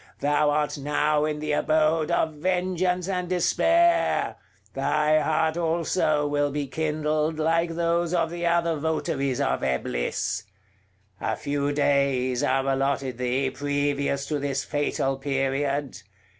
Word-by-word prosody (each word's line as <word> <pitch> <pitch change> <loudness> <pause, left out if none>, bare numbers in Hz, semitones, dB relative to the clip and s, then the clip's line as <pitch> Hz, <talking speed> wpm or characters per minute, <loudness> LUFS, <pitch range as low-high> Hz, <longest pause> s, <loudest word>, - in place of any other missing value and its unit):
thou 145 +1 +2
art 150 0 0
now 150 +1 +1
in 155 -1 -2
the 150 0 -3
abode 155 +1 +2
of 160 - +1
vengeance 180 +2 0
and 180 -2 -2
despair; 335 - +2 0.4
thy 155 0 +2
heart 160 +1 +1
also 165 -2 +1
will 145 0 +1
be 145 0 -2
kindled, 155 +1 -1
like 165 +1 +1
those 170 0 0
of 170 -2 0
the 175 0 -5
other 170 -1 +2
votaries 150 -3 -1
of - - 0
Eblis. 65 -2 -2 0.8
A - - -1
few 145 0 -2
days 140 -3 +1
are 135 -2 +1
allotted 135 -2 -1
thee 130 +2 0
previous 145 -1 -1
to 150 0 -2
this 140 -1 -2
fatal 140 -2 -1
period. 135 0 -1
150 Hz, 130 wpm, -25 LUFS, 140-165 Hz, 0.8 s, thou